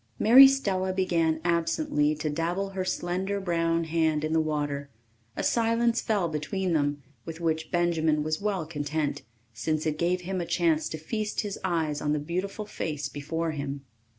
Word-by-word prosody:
Mary 255 - +9
Stella 195 -9 0
began 170 -4 +1
absently 170 - +1
to 155 +1 -3
dabble 170 +6 -1
her 190 -1 -3
slender 185 +2 -2
brown 165 -2 0
hand 160 -2 +1
in 155 +1 -1
the 160 - +3
water. 145 -2 -2 0.5
A - - -3
silence 230 0 +2
fell 205 -6 +1
between 170 +4 -2
them, 145 -2 0 0.2
with 165 0 -7
which 160 -2 -1
Benjamin 160 -3 +1
was 155 +2 -2
well 200 -5 -1
content, 150 -1 -2 0.3
since 155 +8 -2
it 155 -1 -1
gave 180 +1 +1
him 185 +1 -3
a - - -3
chance 165 -3 +1
to 155 - -4
feast 210 +7 -2
his 205 -2 -5
eyes 160 -5 -1
on 150 0 0
the 150 - 0
beautiful 185 +7 -3
face 155 -7 -4
before 160 +3 -3
him. 140 -2 -4
165 Hz, 170 wpm, -27 LUFS, 155-190 Hz, 0.5 s, Mary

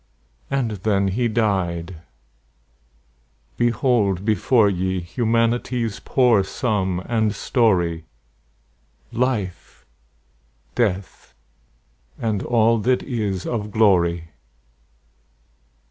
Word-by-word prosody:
And 135 -5 -1
then 100 0 +1
he 120 +5 0
died! 95 -6 -1 1.6
Behold 115 -5 +1
before 110 +1 +3
ye 95 -1 -1
Humanity's 115 +3 -1
poor 120 -6 +3
sum 95 -3 -1
and 110 -3 0
story; 90 - +1 1.1
Life, 100 - -3 0.9
Death, 95 - -2 0.8
and 110 -4 -1
all 115 -1 +2
that 125 +4 +1
is 105 -8 -3
of 105 -3 -3
glory. 85 -6 +2
105 Hz, 75 wpm, -22 LUFS, 95-115 Hz, 1.6 s, before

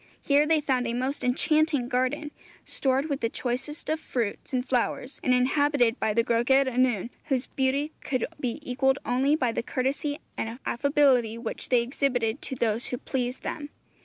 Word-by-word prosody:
Here 290 +1 +4
they 320 -1 +3
found 255 -4 0
a 235 - -2
most 260 +3 -2
enchanting 295 +1 +2
garden, 260 +4 -1 0.3
stored 265 +1 0
with 280 -3 -2
the 230 - 0
choicest 260 +6 -3
fruits 235 -8 -3
and 255 -1 -1
flowers, 250 +1 -1
and 255 - +2
inhabited 255 -1 +3
by 220 - +1
the 230 - +4
Gwragedd 240 +4 +3
Annwn, 245 -4 +1
whose 270 -4 0
beauty 275 +3 0
could 255 -4 0
be 245 -5 -2
equalled 265 +2 +2
only 265 +4 +2
by 255 -6 +1
the - - -2
courtesy 270 +4 -1 0.2
and 225 +1 -3
affability 255 -4 +2
which 230 -1 -6
they 245 -2 +4
exhibited 245 -2 -1
to 265 - -5
those 230 -1 0
who 250 - -3
pleased 250 0 -3
them. 290 -1 -4
255 Hz, 165 wpm, -27 LUFS, 245-280 Hz, 0.3 s, Here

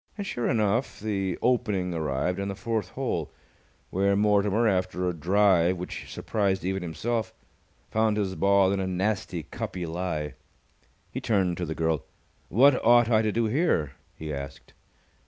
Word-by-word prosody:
And 200 - -4
sure 120 -10 -2
enough, 110 +3 0
the 95 -4 -2
opening 100 -7 +1
arrived 80 +3 -1
on 100 - -2
the 100 - -4
fourth 105 -1 -2
hole, 100 - -3 0.6
where 100 +1 +2
Mortimer, 105 +2 +3
after 90 -2 0
a 90 - 0
drive 90 +1 +3
which 90 - -7
surprised 100 -4 -1
even 95 0 -1
himself, 110 +7 -3 0.6
found 110 -1 +2
his 100 -3 -1
ball 100 0 +3
in 100 - 0
a 95 - -1
nasty 95 -2 -1
cuppy 90 +3 -5
lie. 80 -3 -3 0.8
He - - -4
turned 95 -5 +1
to 90 - -3
the 80 - -3
girl. 80 -3 0 0.5
"What 130 +5 +5
ought 120 0 +5
I 110 -1 +5
to 110 -1 0
do 115 +2 +1
here?" 110 - +1 0.2
he 75 -1 -6
asked. 70 -1 -8
95 Hz, 155 wpm, -27 LUFS, 90-110 Hz, 0.8 s, What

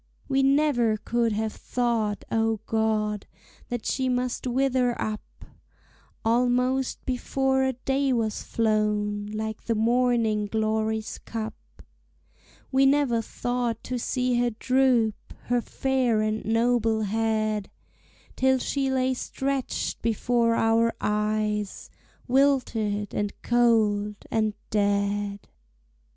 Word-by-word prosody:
We 270 -1 +2
never 270 -5 +3
could 235 +1 0
have 220 +1 -2
thought, 230 -4 -1
O 225 -1 +1
God, 215 -2 0 0.4
That 240 -2 -4
she 260 -1 0
must 250 0 -1
wither 250 -1 +1
up, 215 -1 -2 1.0
Almost 250 +3 +1
before 265 +1 0
a 265 0 +1
day 270 +2 0
was 225 -3 0
flown, 210 -2 0
Like 215 +1 -5
the 230 - 0
morning 230 -2 +2
glory's 220 0 -1
cup; 225 -1 -5 1.2
We 270 0 +4
never 270 -5 +3
thought 240 0 -3
to 250 0 -3
see 250 0 0
her 245 0 +2
droop 240 -1 +1
Her 245 0 +1
fair 255 -3 0
and 215 0 -1
noble 225 -1 +2
head, 215 -1 0 0.7
Till 265 0 +3
she 270 +1 -1
lay 260 0 +1
stretched 270 +1 -3
before 230 +1 +1
our 225 +1 +3
eyes, 210 -1 -1 0.4
Wilted, 245 -6 +1
and 205 -1 -3
cold, 215 -4 +2 0.2
and 215 -2 +1 0.2
dead! 200 -1 0
230 Hz, 110 wpm, -26 LUFS, 215-255 Hz, 1.2 s, We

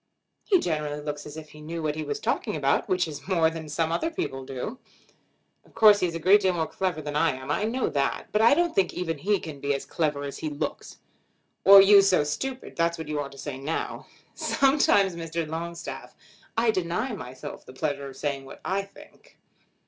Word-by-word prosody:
"He 390 - +4
generally 150 - -2
looks 145 0 -5
as 150 - -9
if 155 -1 -9
he 150 - -13
knew 165 +2 -5
what 150 -1 0
he 155 +1 -4
was 145 -1 -3
talking - - -1
about, 140 -2 +1
which 180 -2 +1
is 155 +2 -8
more 165 -4 +3
than 160 -2 -7
some 160 +2 0
other 170 - 0
people 135 - -4
do." 135 - -6 0.8
"Of - - -25
course 210 -2 +7
he 180 - +2
is 165 - -5
a - - -3
great 195 +5 +5
deal 190 -2 +2
more 160 -2 0
clever 180 -3 -3
than 145 0 -5
I 165 0 +3
am. 130 +2 -6
I 205 - 0
know 250 +4 0
that. 140 -1 -1
But 210 - +2
I 235 +5 +6
don't 345 +1 +1
think 190 -2 +1
even 165 -4 -3
he 200 +6 +1
can 155 -5 -8
be 140 0 0
so - - -10
clever 150 -3 -1
as 140 -1 -6
he 155 - -3
looks. 145 -1 -5 0.7
'Or 195 0 +10
you 200 0 +8
so 190 -5 +3
stupid,' 255 - -4
that's 170 0 +1
what 160 -2 -7
you 150 -1 -1
ought 140 -1 -4
to - - -14
say 135 -2 -6
now." 150 +4 -4 0.3
"Sometimes, 265 - +3
Mr. 165 -1 -3
Longstaff, 170 +2 -6 0.4
I 225 0 +4
deny 185 +6 -2
myself 130 -10 -8
the 130 - -11
pleasure 140 0 -3
of 135 - -12
saying 140 -2 -2
what 135 - -11
I 195 +1 0
think." 200 0 -17
165 Hz, 215 wpm, -26 LUFS, 145-195 Hz, 0.8 s, Or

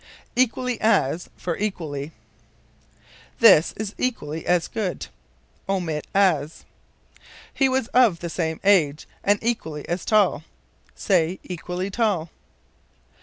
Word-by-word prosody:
Equally 250 -1 0
as 170 -6 +1
for 175 -2 -3
Equally. 160 -8 -4 1.3
"This 190 -9 +7
is 215 -1 -4
equally 160 -11 -3
as 175 -2 +2
good." 200 -5 -3 0.6
Omit 170 -6 -2
as. 165 -6 +1 0.9
"He 270 -1 +2
was 260 -2 0
of 240 -8 +4
the 175 - -5
same 160 -2 -2
age, 160 -7 +3 0.2
and 205 +1 +3
equally 160 -11 -3
as 175 +1 -2
tall." 205 -7 +2 0.5
Say, 180 -2 +1
equally 180 +2 -5
tall. 195 -7 0
180 Hz, 110 wpm, -23 LUFS, 160-215 Hz, 1.3 s, This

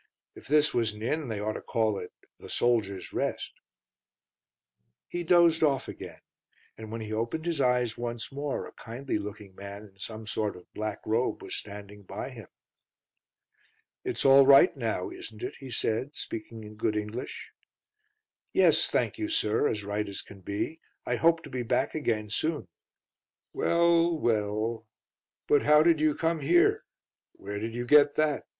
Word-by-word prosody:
If - - -14
this 150 +1 +3
was 115 -3 +1
an 105 +1 -9
inn 150 +4 -1
they 110 -3 -3
ought 105 +1 -1
to - - -6
call 110 -4 0
it 90 - -8 0.3
The - - -11
Soldiers' 105 -6 0
Rest." - - -2 1.5
He 175 - -4
dozed 170 -1 +5
off 140 -4 +2
again, - - -9 0.5
and 110 -1 -9
when 115 0 -4
he 110 0 -5
opened 115 +9 -2
his 165 -4 0
eyes 125 -3 +1
once 120 +1 -4
more 140 +1 -3
a - - -10
kindly 120 0 -4
looking 105 -1 -8
man 100 +2 -9
in 100 -2 -17
some 110 +2 -7
sort 105 0 -2
of 90 - -13
black 110 -1 -4
robe 115 +3 0
was - - -5
standing 105 0 -8
by 95 - -6
him. - - -11 1.6
"It's - - -2
all 135 0 +8
right 140 +5 +7
now, 115 -8 -2
isn't 110 0 -9
it?" - - -4
he 135 - -10
said, 120 +4 -1
speaking 110 0 -7
in 105 0 -11
good 105 0 0
English. 105 +4 -5 1.0
"Yes, - - +5
thank - - 0
you, 320 0 -2
sir, 110 - +2
as 105 -1 -2
right 105 +1 -2
as 100 - -6
can 100 - -13
be. 100 - -4 0.2
I - - 0
hope 165 0 +3
to 150 - -9
be 125 - -2
back 120 +1 0
again 110 -9 -1
soon." 155 - -1 0.9
"Well 170 0 +3
well; 110 -1 -1 0.6
but 145 - +4
how 150 +1 +6
did 165 -2 +4
you 155 -1 +3
come 165 0 0
here? 170 +5 +3 0.5
Where 100 +1 -6
did 115 +2 -4
you 120 0 -3
get 145 +2 +6
that?" 155 -2 0
115 Hz, 170 wpm, -28 LUFS, 105-150 Hz, 1.6 s, all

